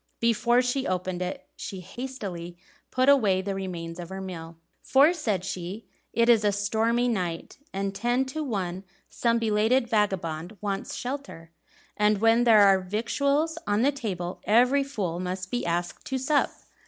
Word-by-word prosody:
Before 235 +2 +3
she 255 +2 -1
opened 185 0 -2
it 180 +1 -4
she 190 - -6
hastily 190 -5 -7 0.3
put 255 +1 +1
away 220 -10 +5
the 195 +1 -3
remains 175 -3 -5
of 175 -1 -7
her 190 0 -6
meal. 170 -3 -7 0.3
"For," 285 +6 +5
said 215 - -2
she, 190 +3 -5 0.3
"it 230 0 +2
is 230 -3 +5
a 205 - +3
stormy 220 +4 +1
night, 180 -6 -3
and 195 0 -2
ten 240 +6 +1
to 305 +4 -4
one 190 -8 -3 0.3
some 235 -1 +1
belated 225 +3 +2
vagabond 190 -4 -1
wants 200 -1 -3
shelter; 250 -11 -6 0.4
and 210 0 +3
when 225 +3 +4
there 220 -3 +7
are 195 -1 +6
victuals 280 - 0
on 205 +3 +2
the 280 - +4
table 190 -10 -4
every 250 +6 +4
fool 195 -11 -3
must 185 +1 -4
be 245 -5 -1
asked 175 +1 -2
to 265 - -1
sup." 280 +3 +2
210 Hz, 160 wpm, -27 LUFS, 185-245 Hz, 0.4 s, there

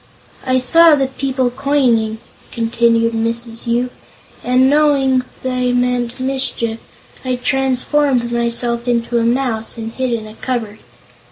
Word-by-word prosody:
"I 255 0 +2
saw 330 +5 +6
the 275 -2 +1
people 265 -1 -2
coming," 250 -5 +1 0.3
continued 230 0 +1
Mrs. 230 +1 -3
Yoop, 240 +2 0 0.5
"and 255 +1 +3
knowing 275 -3 +3 0.2
they 250 -1 -1
meant 245 0 -1
mischief 260 -4 -1 0.4
I 255 -1 -1
transformed 265 0 +1
myself 235 0 -1
into 235 0 0
a - - 0
mouse 235 -2 -1
and 225 0 -5
hid 260 0 -2
in 225 -2 -2
a 215 - -11
cupboard. 225 -3 -4
245 Hz, 125 wpm, -17 LUFS, 235-265 Hz, 0.5 s, saw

